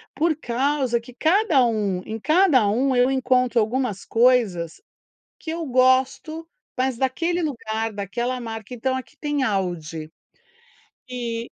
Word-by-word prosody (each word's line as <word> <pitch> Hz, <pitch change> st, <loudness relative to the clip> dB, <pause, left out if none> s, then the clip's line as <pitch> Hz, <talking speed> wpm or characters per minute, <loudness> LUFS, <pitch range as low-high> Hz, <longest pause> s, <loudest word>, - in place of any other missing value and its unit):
Por 320 Hz, 0 st, +1 dB
causa 260 Hz, -2 st, 0 dB
que 235 Hz, +2 st, -14 dB
cada 320 Hz, -, +3 dB
um 205 Hz, -5 st, -1 dB
em 220 Hz, +1 st, -5 dB
cada 305 Hz, -, +4 dB
um, 260 Hz, +5 st, +1 dB
eu 250 Hz, +1 st, +4 dB
encontro 255 Hz, -2 st, +2 dB
algumas 225 Hz, -2 st, -1 dB
coisas 225 Hz, -, +2 dB, 0.6 s
que 320 Hz, -, -8 dB
eu 330 Hz, -1 st, -4 dB
gosto, 260 Hz, +5 st, +1 dB, 0.3 s
mas 255 Hz, -1 st, 0 dB
daquele 330 Hz, +8 st, 0 dB
lugar, 225 Hz, -7 st, -3 dB
daquela 235 Hz, +6 st, -3 dB
marca. 225 Hz, 0 st, -7 dB
Então, 260 Hz, +2 st, -1 dB
aqui 260 Hz, -, -7 dB
tem 295 Hz, -1 st, -2 dB
Aldi. 165 Hz, -7 st, -3 dB, 1.0 s
Eh, 235 Hz, -2 st, -4 dB
250 Hz, 130 wpm, -23 LUFS, 225-270 Hz, 1.0 s, cada